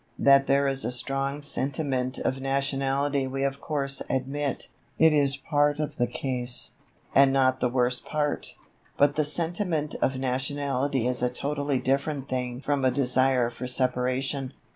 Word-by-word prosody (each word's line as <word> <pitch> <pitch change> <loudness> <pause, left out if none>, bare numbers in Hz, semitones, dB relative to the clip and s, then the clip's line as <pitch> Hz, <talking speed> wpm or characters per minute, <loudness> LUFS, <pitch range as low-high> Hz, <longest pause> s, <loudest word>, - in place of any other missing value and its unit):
That 140 0 +5
there 140 0 +3
is 135 0 -1
a 120 - -2
strong 135 +3 -2
sentiment 135 -2 -1
of 135 +1 -2
nationality 135 0 0
we 135 +1 -3
of 140 0 -2
course 140 -3 -2
admit; 135 +1 -2 0.3
it 160 -1 +5
is 140 -2 +2
part 145 +1 +1
of 150 0 -4
the 120 - +1
case, 125 -1 -1 0.4
and 135 0 +6
not 130 -1 +2
the 125 - +1
worst 125 -1 0
part. 150 -1 -2 0.4
But 145 0 +4
the 155 - +2
sentiment 165 0 0
of 130 - +1
nationality 135 0 -1
is 125 0 +1
a 125 - +2
totally 145 +2 -2
different 140 +2 -1
thing 125 -1 -3
from 145 -1 -1
a 130 - +4
desire 125 -1 +2
for 125 +2 -6
Separation. 130 +1 0
135 Hz, 155 wpm, -26 LUFS, 130-145 Hz, 0.4 s, and